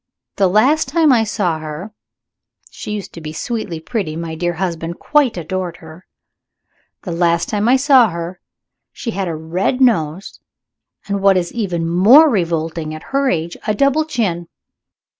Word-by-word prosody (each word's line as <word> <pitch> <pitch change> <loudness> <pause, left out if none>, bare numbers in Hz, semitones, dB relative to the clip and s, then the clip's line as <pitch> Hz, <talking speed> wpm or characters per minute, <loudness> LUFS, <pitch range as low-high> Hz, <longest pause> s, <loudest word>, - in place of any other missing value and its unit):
The 195 - +3
last 265 - +3
time 315 +1 +3
I 230 -2 +3
saw 185 -6 -1
her 155 +7 -7 0.8
(she - - -9
used 210 -2 -5
to 165 - -9
be 155 -1 -6
sweetly 205 -2 -4
pretty; 170 -3 -4
my 165 0 -5
dear 175 +2 -2
husband 170 -1 -4
quite 290 -8 +1
adored 180 +1 -4
her) 160 +3 -14 1.0
the 180 - -5
last 170 0 +1
time 210 +2 0
I 255 - +6
saw 265 -4 +5
her 170 +1 -6 0.5
she 230 - -5
had 195 -3 -3
a 165 - -3
red 170 +10 -2
nose, 185 - 0 0.7
and, 200 -1 -2
what 195 -1 +4
is 175 -1 -2
even 180 -8 -2
more 230 - +6
revolting 165 -4 -2
at 155 - -10
her 275 -1 +2
age, 170 0 -2
a 215 - +1
double 280 +6 +2
chin. 200 - -2
185 Hz, 160 wpm, -18 LUFS, 165-230 Hz, 1.0 s, I